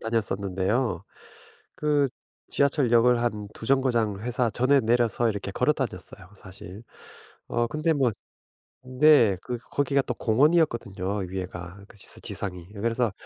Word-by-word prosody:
다녔었는데요. 100 Hz, -1 st, -1 dB, 0.7 s
그 150 Hz, -2 st, +2 dB, 0.4 s
지하철역을 125 Hz, -4 st, +3 dB
한 105 Hz, -3 st, -2 dB
2 110 Hz, -, -9 dB
정거장 120 Hz, -6 st, +1 dB
회사 120 Hz, +1 st, -1 dB
전에 135 Hz, +5 st, +3 dB
내려서 120 Hz, 0 st, +1 dB
이렇게 100 Hz, -2 st, -4 dB
걸어 125 Hz, +9 st, +2 dB
다녔어요 100 Hz, -, -6 dB
사실. 95 Hz, +1 st, -11 dB, 0.7 s
어 120 Hz, -, 0 dB
근데 155 Hz, +5 st, 0 dB
뭐 135 Hz, -5 st, +2 dB, 0.7 s
네. 130 Hz, -5 st, +5 dB
그 125 Hz, -1 st, -4 dB
거기가 140 Hz, 0 st, +1 dB
또 125 Hz, -, -4 dB
공원이었거든요 115 Hz, -, +1 dB
위에가. 90 Hz, 0 st, -7 dB
그 -, -, -17 dB
지상 -, -, -8 dB
지상이. 90 Hz, -3 st, -4 dB
예 -, -, -7 dB
그래서 115 Hz, 0 st, 0 dB
115 Hz, 290 characters per minute, -26 LUFS, 100-130 Hz, 0.7 s, 네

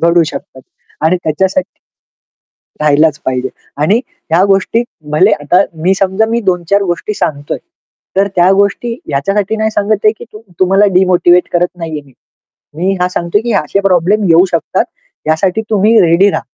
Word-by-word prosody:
घडू 170 Hz, 0 st, +4 dB
शकतात. 130 Hz, -3 st, -8 dB, 0.4 s
आणि 160 Hz, +4 st, +2 dB
त्याच्यासाठी 190 Hz, -, -1 dB, 1.0 s
राहिलाच 150 Hz, 0 st, +3 dB
पाहिजे. 130 Hz, 0 st, -1 dB, 0.3 s
आणि 200 Hz, +9 st, +3 dB, 0.3 s
ह्या 170 Hz, +3 st, +3 dB
गोष्टी 195 Hz, +4 st, +1 dB, 0.3 s
भले 150 Hz, -, +3 dB
आता 175 Hz, +6 st, +3 dB, 0.2 s
मी 185 Hz, +3 st, +3 dB
समजा 195 Hz, +3 st, +1 dB
मी 230 Hz, +1 st, -1 dB
2-4 190 Hz, 0 st, 0 dB
गोष्टी 175 Hz, +2 st, -3 dB
सांगतोय, 145 Hz, -6 st, -3 dB, 0.6 s
तर 200 Hz, +1 st, +2 dB
त्या 175 Hz, +1 st, +4 dB
गोष्टी 200 Hz, +4 st, 0 dB
याच्यासाठी 200 Hz, +9 st, -1 dB
नाही 220 Hz, 0 st, 0 dB
सांगत 210 Hz, 0 st, -1 dB
आहे 215 Hz, -, +5 dB
की -, -, -9 dB, 0.4 s
तुम्हाला 195 Hz, +2 st, +4 dB
डिमोटिव्हेट 180 Hz, -1 st, +3 dB
करत 175 Hz, +1 st, 0 dB
नाहीये 160 Hz, -3 st, -5 dB
मी. 135 Hz, -, -20 dB, 0.6 s
मी 190 Hz, +4 st, 0 dB
हा 180 Hz, -, +2 dB
सांगतोय 175 Hz, +2 st, -1 dB
की 235 Hz, -1 st, -2 dB
असे 150 Hz, +7 st, -1 dB
प्रॉब्लेम 195 Hz, +2 st, +2 dB
येऊ 165 Hz, +2 st, +5 dB
शकतात, 170 Hz, -, 0 dB, 0.4 s
यासाठी 180 Hz, +7 st, +1 dB
तुम्ही 215 Hz, +2 st, +3 dB
रेडी 175 Hz, +4 st, +4 dB
रहा. -, -, -2 dB
185 Hz, 150 wpm, -13 LUFS, 165-200 Hz, 1.0 s, आहे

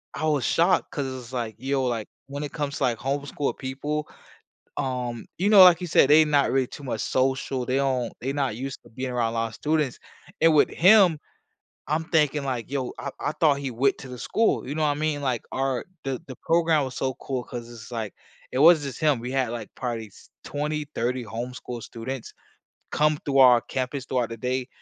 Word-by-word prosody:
I 155 Hz, -, -2 dB
was 150 Hz, -4 st, +1 dB
shocked 175 Hz, +3 st, +2 dB
'cause 145 Hz, -, -2 dB
it's, 130 Hz, -1 st, -8 dB
like, 115 Hz, -3 st, -3 dB
yo, 135 Hz, 0 st, 0 dB
like, 115 Hz, -3 st, -2 dB, 0.2 s
when 140 Hz, +1 st, -5 dB
it 145 Hz, -, -5 dB
comes 145 Hz, -2 st, -3 dB
to, -, -, -2 dB
like, 120 Hz, -2 st, +1 dB
homeschool 140 Hz, +2 st, -2 dB
people, 145 Hz, +3 st, -3 dB, 0.7 s
um, 125 Hz, -3 st, -3 dB
you 195 Hz, +4 st, +2 dB
know, 200 Hz, -3 st, +9 dB
like 175 Hz, -1 st, +7 dB
you 180 Hz, -, -3 dB
said, 145 Hz, -3 st, +4 dB
they 155 Hz, +1 st, +8 dB
not 145 Hz, -2 st, +2 dB
really 130 Hz, -1 st, +2 dB
too 145 Hz, -, -11 dB
much 115 Hz, -4 st, -3 dB
social. 130 Hz, 0 st, 0 dB
They 130 Hz, -, 0 dB
don't 130 Hz, -3 st, 0 dB
they 135 Hz, +3 st, -2 dB
not 135 Hz, -6 st, -1 dB
used 135 Hz, +2 st, -6 dB
to -, -, -17 dB
being 130 Hz, +2 st, -4 dB
around 120 Hz, -2 st, 0 dB
a -, -, -3 dB
lot 115 Hz, 0 st, 0 dB
of 110 Hz, -, -13 dB
students. 150 Hz, -4 st, 0 dB, 0.4 s
And 165 Hz, -1 st, +6 dB
with 150 Hz, -, +5 dB
him, 185 Hz, -3 st, +6 dB, 0.7 s
I'm 155 Hz, +2 st, 0 dB
thinking, 150 Hz, -3 st, +2 dB
like, 125 Hz, -3 st, -3 dB
yo, 135 Hz, -3 st, -2 dB
I 140 Hz, -, -4 dB
I -, -, -1 dB
thought 145 Hz, -4 st, +4 dB
he 135 Hz, -2 st, -4 dB
went 130 Hz, +4 st, +1 dB
to 130 Hz, -, -9 dB
the 125 Hz, -, -8 dB
school. 225 Hz, -, +1 dB
You 145 Hz, -, -3 dB
know 155 Hz, -, 0 dB
what 145 Hz, -, +2 dB
mean? 150 Hz, -1 st, -1 dB
Like, 125 Hz, -3 st, -1 dB
our 135 Hz, -1 st, -1 dB, 0.2 s
the 135 Hz, -2 st, -3 dB
the 130 Hz, -3 st, -9 dB
program 165 Hz, -3 st, +2 dB
was 130 Hz, -, -7 dB
so 130 Hz, -1 st, -1 dB
cool 130 Hz, -3 st, -3 dB
'cause 120 Hz, -1 st, -7 dB
it's, 115 Hz, -1 st, -11 dB
like, 110 Hz, -4 st, -4 dB, 0.4 s
it 130 Hz, -, -1 dB
wasn't 160 Hz, -2 st, +7 dB
just 130 Hz, -, -7 dB
him. 150 Hz, -4 st, +3 dB
We 125 Hz, +2 st, -5 dB
had, 130 Hz, -3 st, 0 dB
like, 115 Hz, -3 st, -5 dB
probably 120 Hz, -3 st, -3 dB
s -, -, -19 dB
twenty, 150 Hz, +1 st, -3 dB
thirty 125 Hz, +1 st, -1 dB
homeschool 120 Hz, +1 st, -6 dB
students 120 Hz, +3 st, -6 dB, 0.6 s
come 150 Hz, 0 st, +2 dB
through 140 Hz, -1 st, +2 dB
our 125 Hz, -3 st, +7 dB
campus 130 Hz, 0 st, -4 dB
throughout 125 Hz, -4 st, -1 dB
the 115 Hz, -, -6 dB
day 125 Hz, +2 st, -2 dB
135 Hz, 215 wpm, -25 LUFS, 125-150 Hz, 0.7 s, know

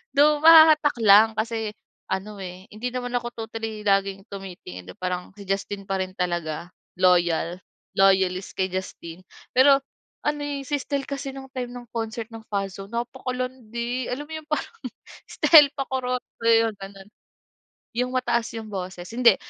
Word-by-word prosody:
though 295 Hz, +1 st, +5 dB
mahahatak 315 Hz, -3 st, +8 dB
lang 210 Hz, +2 st, +8 dB
kasi 220 Hz, -1 st, -2 dB, 0.4 s
ano, 200 Hz, +1 st, -3 dB
eh, 185 Hz, +1 st, -9 dB
hindi 220 Hz, +4 st, -4 dB
naman 245 Hz, -1 st, -4 dB
ako 240 Hz, 0 st, -6 dB, 0.2 s
totally 220 Hz, -1 st, -5 dB
laging 195 Hz, -1 st, +1 dB
tumitingin 180 Hz, -, -9 dB
hindi 90 Hz, -, -9 dB
parang 180 Hz, -1 st, -3 dB
si 200 Hz, -, -10 dB
Justin 195 Hz, +1 st, -2 dB
pa 195 Hz, -1 st, -1 dB
rin 185 Hz, 0 st, -3 dB
talaga, 175 Hz, -1 st, -3 dB, 0.3 s
loyal, 175 Hz, -1 st, +3 dB, 0.4 s
loyalist 190 Hz, -1 st, +3 dB
kay 190 Hz, 0 st, +1 dB
Justin, 185 Hz, -2 st, -6 dB, 0.3 s
pero 275 Hz, +1 st, +7 dB, 0.5 s
ano, 295 Hz, 0 st, 0 dB
eh, 285 Hz, -1 st, -3 dB
si 290 Hz, -, 0 dB
Stell 280 Hz, -1 st, -3 dB
kasi 275 Hz, -1 st, -5 dB
ng 265 Hz, -1 st, -9 dB
time 245 Hz, -1 st, -4 dB
ng 245 Hz, -1 st, -9 dB
concert 225 Hz, 0 st, -4 dB
ng 225 Hz, -1 st, -9 dB
Fast 195 Hz, -1 st, -3 dB
Zone 200 Hz, -, -14 dB
napakalandi 250 Hz, 0 st, -4 dB
alam 280 Hz, +4 st, -4 dB
mo 320 Hz, -, -9 dB
yun 310 Hz, -1 st, -7 dB
parang 305 Hz, +8 st, -2 dB, 0.5 s
Stell 295 Hz, -4 st, +7 dB
pakurot 255 Hz, -2 st, -2 dB, 0.2 s
so 230 Hz, -, -4 dB
yung 225 Hz, -2 st, +4 dB
ganun. 195 Hz, 0 st, -11 dB, 0.9 s
Yung 250 Hz, +1 st, +1 dB
mataas 235 Hz, -2 st, 0 dB
yung 220 Hz, -1 st, -6 dB
boses 180 Hz, -2 st, -5 dB
hindi 235 Hz, -4 st, +5 dB
220 Hz, 155 wpm, -24 LUFS, 190-255 Hz, 0.9 s, mahahatak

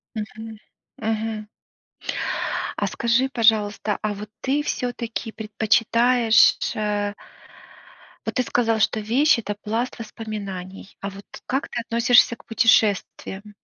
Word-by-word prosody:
Мгм, 215 Hz, -1 st, -2 dB, 0.7 s
мгм. 220 Hz, -1 st, -2 dB, 1.3 s
А, -, -, 0 dB
скажи, 235 Hz, +3 st, +1 dB
пожалуйста, 215 Hz, -4 st, +2 dB
а 215 Hz, -1 st, -1 dB
вот 210 Hz, +1 st, -8 dB
ты 280 Hz, +3 st, 0 dB
всё-таки 235 Hz, -4 st, -3 dB
предпочитаешь 225 Hz, +2 st, +3 dB, 0.2 s
э 205 Hz, -1 st, -1 dB, 1.1 s
вот -, -, -2 dB
ты 255 Hz, -, +3 dB
сказал, 230 Hz, -2 st, +1 dB
что 220 Hz, 0 st, +2 dB
вещь- 245 Hz, +7 st, +3 dB
это 210 Hz, -2 st, -3 dB
пласт 225 Hz, +5 st, -3 dB
воспоминаний, 200 Hz, -4 st, -7 dB
а 200 Hz, -, -4 dB
вот 200 Hz, +1 st, -12 dB, 0.2 s
как 270 Hz, +2 st, -1 dB
ты 240 Hz, -, -3 dB
относишься 235 Hz, +1 st, +4 dB
к -, -, -21 dB
путешествиям? 210 Hz, -2 st, +1 dB
220 Hz, 115 wpm, -23 LUFS, 210-235 Hz, 1.3 s, относишься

